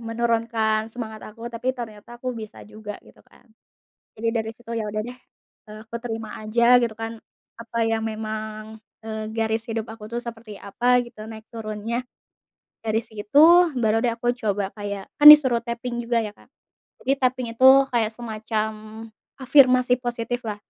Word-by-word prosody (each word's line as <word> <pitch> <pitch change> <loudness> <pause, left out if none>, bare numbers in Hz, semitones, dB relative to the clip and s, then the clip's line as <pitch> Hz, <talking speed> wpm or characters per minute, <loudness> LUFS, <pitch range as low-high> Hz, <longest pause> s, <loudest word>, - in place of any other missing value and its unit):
menurunkan 225 -1 0
semangat 220 -2 -7
aku, 230 +2 -12
tapi 255 +3 -2
ternyata 225 0 -9
aku 250 +1 -4
bisa 220 -2 -9
juga 210 0 -9
gitu - - -19
kan. - - -24 0.7
Jadi 230 +1 -1
dari 220 -1 -1
situ, 230 +1 -9
ya 215 -2 -3
udah 215 - -2
deh, 245 - -7 0.5
eee, 215 0 -11
aku 230 +1 -7
terima 225 -2 -6
aja 235 +3 +4
gitu 235 -3 0
kan, 225 +1 -6 0.4
apa 230 0 -7
yang 225 0 -1
memang, 215 0 -5 0.2
eee, 220 0 -6
garis 225 0 -1
hidup 225 -1 -4
aku 220 -1 -9
tuh 235 +2 -4
seperti 225 -3 -9
apa 245 +5 +2
gitu, 235 -3 -10
naik 220 0 -11
turunnya. 225 +1 -4 0.8
Dari 225 0 -1
situ, 220 +7 +3 0.3
baru 225 -2 +2
deh 245 - +1
aku 240 +1 0
coba 205 -5 -2
kayak 200 -2 -6 0.2
kan 295 - +6
disuruh 265 -6 +9
taping 235 +1 -4
juga 230 -1 0
ya, 210 - -6
Kak. - - -23 0.6
Jadi 270 - +2
taping 255 -1 0
itu 260 +2 +7 0.2
kayak 225 -3 +1
semacam 220 -1 -3 0.7
afirmasi 255 -2 +4
positif 240 0 -3
lah. 205 - -3
225 Hz, 160 wpm, -23 LUFS, 215-240 Hz, 0.8 s, disuruh